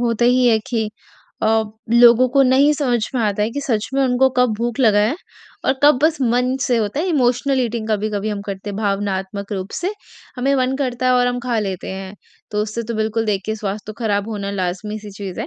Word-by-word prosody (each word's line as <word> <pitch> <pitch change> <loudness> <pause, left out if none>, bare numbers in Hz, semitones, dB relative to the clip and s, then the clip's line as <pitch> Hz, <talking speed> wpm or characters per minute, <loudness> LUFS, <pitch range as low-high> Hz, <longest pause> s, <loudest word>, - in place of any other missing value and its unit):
होता 235 -1 +1
ही 250 +1 +4
है 225 -2 +4
कि 225 -3 -1 0.5
अ, - - +2 0.5
लोगों 240 +1 +6
को 275 - +6
नहीं 270 +3 +4
समझ 250 -7 0
में 250 - +1
आता 210 -1 0
है 215 - 0
कि 285 +4 -4
सच 230 -6 -1
में 275 - +2
उनको 260 0 +3
कब 250 -2 +3
भूख 235 +2 -3
लगा 215 -5 +4
है 215 +7 +2 0.5
और - - +3
कब 290 -3 +6
बस 315 -1 +2
मन 250 +1 +1
से 245 - +2
होता 220 +5 -1
है 350 - -1
इमोशनल 260 -3 +1
ईटिंग 230 -2 -2
कभी-कभी 215 0 -1
हम 205 -1 -3
करते 200 +1 -5
हैं, 200 - -6
भावनात्मक 200 -1 -2
रूप 190 0 -4
से 365 +4 -1 0.4
हमें 270 +3 +1
मन 260 0 0
करता 255 -2 -2
है 255 - +4
और 250 0 +3
हम 245 0 -1
खा 240 -2 -1
लेते 195 -3 -3
हैं, 190 +1 -7 0.4
तो 210 0 0
उससे 215 +2 -4
तो 230 +1 -5
बिल्कुल 220 +1 -1
देखिए 210 +1 -1
स्वास्थ्य 210 -1 -4
तो 215 - -6
खराब 205 -1 0
होना 200 -3 -4
लाज़मी 195 +2 -3
सी 210 -1 -10
चीज़ 195 -2 -7
है, - - -3
225 Hz, 225 wpm, -19 LUFS, 205-250 Hz, 0.5 s, लोगों